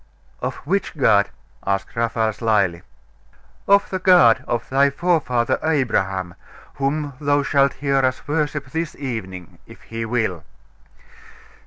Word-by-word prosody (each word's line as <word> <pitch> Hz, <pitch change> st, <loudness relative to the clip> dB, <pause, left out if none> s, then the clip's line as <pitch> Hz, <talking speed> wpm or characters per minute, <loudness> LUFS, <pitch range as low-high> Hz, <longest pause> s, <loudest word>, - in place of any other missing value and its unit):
'Of -, -, -3 dB
which 185 Hz, 0 st, -1 dB
God?' 100 Hz, -7 st, +4 dB, 0.3 s
asked 100 Hz, 0 st, -2 dB
Raphael 115 Hz, -1 st, 0 dB
slyly. 105 Hz, -6 st, +1 dB, 0.9 s
'Of 200 Hz, +1 st, +4 dB
the 185 Hz, -, -2 dB
God 180 Hz, -12 st, +5 dB
of 120 Hz, -1 st, -2 dB
thy 140 Hz, +2 st, +3 dB
forefather 140 Hz, -7 st, 0 dB
Abraham, 95 Hz, -, 0 dB, 0.4 s
whom 140 Hz, +1 st, -1 dB
thou 145 Hz, 0 st, +2 dB
shalt 140 Hz, 0 st, +2 dB
hear 140 Hz, 0 st, -1 dB
us 130 Hz, +1 st, 0 dB
worship 145 Hz, -1 st, -1 dB
this 160 Hz, 0 st, -3 dB
evening, 95 Hz, -, -6 dB
if -, -, -14 dB
He 115 Hz, 0 st, -5 dB
will. 110 Hz, -8 st, -1 dB
130 Hz, 125 wpm, -21 LUFS, 110-145 Hz, 0.9 s, God